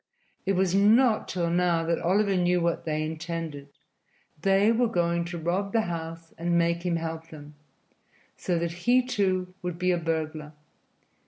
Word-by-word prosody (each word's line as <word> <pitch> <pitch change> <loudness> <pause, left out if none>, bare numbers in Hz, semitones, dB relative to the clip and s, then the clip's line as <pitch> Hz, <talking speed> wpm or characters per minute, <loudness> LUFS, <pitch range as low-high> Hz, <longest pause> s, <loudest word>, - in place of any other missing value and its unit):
It 195 - +3
was 185 -1 +1
not 215 +4 +4
till 170 -2 -1
now 175 -1 +2
that 165 0 0
Oliver 195 +3 +2
knew 180 0 +2
what 170 -1 -1
they 155 -1 -1
intended 160 -2 -5
that 140 - -34 0.7
they 195 +3 +4
were 235 +1 +2
going 170 -4 0
to 170 0 -5
rob 180 +5 -2
the 225 - +3
house 165 -1 -6
and 170 +1 +1
make 170 0 +1
him 175 -2 0
help 165 0 -4
them, 150 -1 -11 0.8
so 175 -2 -1
that 170 0 -1
he, 245 +9 +2
too, 185 -6 0
would 180 -2 -4
be 180 +1 +1
a 175 - +1
burglar. 155 -2 -3
170 Hz, 170 wpm, -27 LUFS, 165-190 Hz, 0.8 s, not